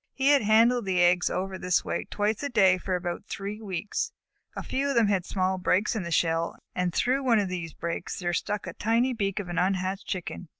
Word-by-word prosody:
He 270 +1 +2
had 285 -1 +5
handled 225 +2 +4
the 185 -1 +1
eggs 175 0 +4
over 190 +1 -3
in 190 - -7
this 180 -1 +1
way - - -2
twice 210 +1 -1
a 285 - -2
day 190 -6 +4
for 185 0 -2
about 175 -1 -4
three 210 +1 -5
weeks. 195 -1 -3 0.4
A - - -5
few 275 +2 -1
of 275 - -1
them 230 -3 +4
had 190 -3 0
small 185 -1 0
breaks 190 +5 +1
in 220 - -1
the 170 - -5
shell, 165 0 +1 0.2
and 180 -1 0
through 260 +9 +1
one 240 -3 +4
of 200 -3 0
these 170 -4 -5
breaks 170 0 -4
there 175 -2 -2
stuck 205 +3 -2
out - - -8
the - - -8
tiny 235 +4 +2
beak 200 -4 -2
of 200 - -3
an 175 -1 -2
unhatched 190 +1 -1
Chicken. 180 -2 -5
195 Hz, 240 wpm, -27 LUFS, 180-220 Hz, 0.4 s, had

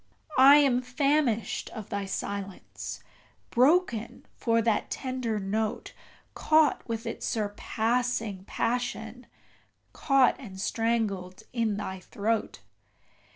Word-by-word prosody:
I 275 +2 +10
am 275 -4 +4
famished 255 -2 0
of 220 -3 -7
thy 200 -1 -2
silence 200 0 -6 0.5
broken 250 -4 +2
for 230 0 +1
the 225 -2 +2
tender 255 -4 -2
note 210 +2 -2 0.4
Caught 310 -5 +2
with 225 0 -3
its 230 - -4
surpassing 220 -1 -1
passion 245 0 -3 0.7
caught 275 -3 +3
and 195 -8 -10
strangled 215 -4 -1
in 225 -4 0
thy 190 -2 -5
throat! 210 - -2
230 Hz, 100 wpm, -28 LUFS, 205-250 Hz, 0.7 s, I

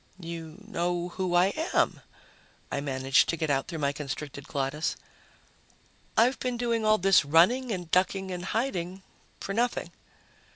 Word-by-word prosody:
"You 165 -2 -7
know 175 -3 -1
who 180 0 -2
I 180 +3 +4 0.2
am," - - +2 0.7
I 140 - -1
managed 135 -1 +2
to 170 - 0
get 160 -3 0
out 135 -1 0
through 165 - -5
my 140 - +1
constricted 140 0 -6
glottis. 140 +2 -1 1.2
"I've 245 +4 +4
been 250 -1 -2
doing 235 -2 0
all 215 0 +4
this 195 -2 +5
running 185 - +4
and 180 -5 -4
ducking 190 +1 +1
and 180 0 -5
hiding 190 -5 -2 0.4
for 195 - -4
nothing." 240 +3 0
175 Hz, 150 wpm, -28 LUFS, 155-200 Hz, 1.2 s, this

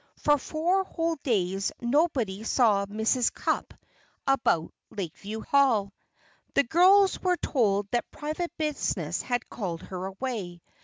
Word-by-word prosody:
For 295 -1 +3
four 345 +8 0
whole 330 -3 -2
days 195 -7 0
nobody 240 - +1
saw 215 -4 +3
Mrs. 220 +4 +1
Cupp - - -2 0.5
about 240 -12 +1 0.2
Lakeview 205 +3 -6
Hall! 230 -9 +2 0.6
The - - +5
girls 375 +7 +5
were 360 -1 +2
told 205 -10 +1
that 240 - -1
private 310 +4 -4
business 305 -2 -1
had 245 -1 -2
called 175 -7 -5
her 185 0 -5
away. 195 -5 -5
240 Hz, 120 wpm, -27 LUFS, 200-305 Hz, 0.6 s, The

